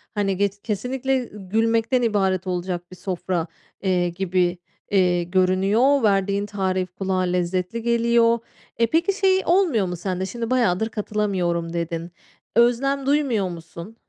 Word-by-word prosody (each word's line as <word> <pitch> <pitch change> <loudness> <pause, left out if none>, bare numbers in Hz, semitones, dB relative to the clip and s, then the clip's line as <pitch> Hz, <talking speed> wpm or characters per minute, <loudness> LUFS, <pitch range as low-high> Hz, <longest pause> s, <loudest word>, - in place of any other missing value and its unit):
Hani 195 -2 0
ge 200 0 +2
kesinlikle 250 +4 -1
gülmekten 225 +5 +1
ibaret 195 -5 +1
olacak 175 -1 -3
bir 185 - -9
sofra, 180 -1 -3 0.3
eee, 180 -2 +1
gibi, 180 0 0 0.3
iii, 180 -3 +2
görünüyor. 195 +9 +3
Verdiğin 200 0 +2
tarif 190 -3 -2
kulağa 190 -1 -1
lezzetli 180 +4 -1
geliyor. 235 0 +3 0.4
E, 230 - +3
peki 335 - +2
şey 380 -1 +2
olmuyor 335 - +3
mu 180 0 -3
sende? 185 +1 -3
Şimdi 230 +4 -4
bayadır 220 -4 +1
katılamıyorum 190 -6 -1
dedin. 170 0 -3 0.4
Özlem 255 +4 +2
duymuyor 265 -9 +1
musun? 170 +5 -9
195 Hz, 130 wpm, -23 LUFS, 180-235 Hz, 0.4 s, görünüyor